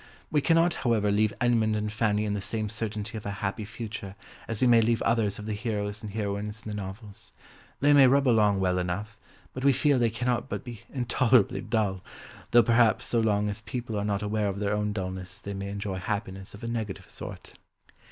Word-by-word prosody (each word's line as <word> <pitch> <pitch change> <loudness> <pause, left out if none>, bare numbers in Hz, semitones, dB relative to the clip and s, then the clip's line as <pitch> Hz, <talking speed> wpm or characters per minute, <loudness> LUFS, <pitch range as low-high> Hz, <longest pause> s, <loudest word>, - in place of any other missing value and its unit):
We 150 - +3
cannot, 165 +3 +4
however, 110 -5 +2
leave 105 +1 +3
Edmund 115 -3 +2
and 105 0 -2
Fanny 110 -1 +1
in 105 - -1
the 105 - -2
same 110 +1 -2
certainty 110 +1 -4
of - - -16
a 100 +1 -5
happy 100 +2 -2
future 105 -2 -7 0.3
as 115 -2 -4
we - - +3
may 120 -2 +6
leave 115 +1 +1
others 110 -3 +1
of 105 - -7
the 110 - -2
heroes 105 -1 -3
and 105 - -6
heroines 105 +1 -3
in 105 - -4
the - - -4
novels; 100 +1 -8 0.5
they 145 +1 +5
may 140 -2 +8
rub 140 +1 +4
along 105 -4 +4
well 90 -1 +1
enough, 95 +5 -3 0.4
but 130 - -5
we 140 - +6
feel 140 +1 +3
they 120 -1 +3
cannot 125 +3 -1
but - - -4
be 120 -3 -8
intolerably 125 -3 +2
dull, 100 -5 -1 0.5
though 120 0 +6
perhaps 115 0 +3
so 120 - +1
long 105 -2 +2
as 105 +1 -3
people 115 0 -5
are 100 - -1
not 105 0 -1
aware 105 0 0
of 100 -1 -2
their 100 0 0
own 105 0 0
dulness 95 -1 -5
they 100 -1 -6
may 100 0 -4
enjoy 100 -1 -4
happiness 100 -1 -4
of 105 - -13
a - - -3
negative 110 -4 -4
sort! - - -9
105 Hz, 210 wpm, -28 LUFS, 100-115 Hz, 0.5 s, may